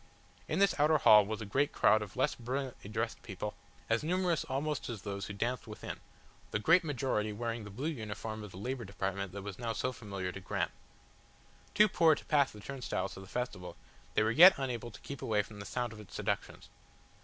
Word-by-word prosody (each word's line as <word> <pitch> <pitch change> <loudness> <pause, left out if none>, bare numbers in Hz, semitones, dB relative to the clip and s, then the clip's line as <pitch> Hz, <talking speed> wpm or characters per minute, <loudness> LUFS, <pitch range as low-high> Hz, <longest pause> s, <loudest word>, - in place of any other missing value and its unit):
In - - -1
this 200 0 +4
outer 155 +2 +5
hall 105 -7 +7
was 110 +1 -3
a - - -4
great 140 +9 +1
crowd 110 - +4
of 105 -2 -7
less - - +2
brilliantly 125 -2 -4
dressed 110 +2 -2
people, 105 +1 -5 0.3
as 115 +3 +1
numerous 175 0 +1
almost 145 +2 -2
as 110 -4 -5
those 100 -1 -4
who 100 - -5
danced 120 +5 -2
within, 105 - -7 0.5
the - - 0
great 170 - +5
majority 130 -8 -1
wearing 115 +1 -3
the - - -8
blue 130 +10 -4
uniform 110 -5 -5
of 105 - -8
the 90 - -11
Labour 125 +5 -3
Department 95 -1 -3
that 100 +1 -7
was 100 0 -7
now 115 -2 -2
so 130 - -1
familiar 100 -6 -5
to 100 - -7
Graham. 95 - -2 1.0
Too 210 0 +7
poor 165 -5 +5
to - - -10
pass 145 -2 +3
the 105 - -12
turnstiles 125 -5 -3
to - - -9
the 95 - -10
festival, 90 -7 -4 0.4
they - - +4
were 110 - +2
yet 175 +9 +9
unable 125 -4 -3
to 105 - -13
keep 140 - -7
away 105 -2 +1
from 105 0 -12
the 100 - -7
sound 120 -2 -2
of 110 - -11
its 105 -4 -11
seductions. 100 -1 -3
115 Hz, 210 wpm, -33 LUFS, 100-135 Hz, 1.0 s, yet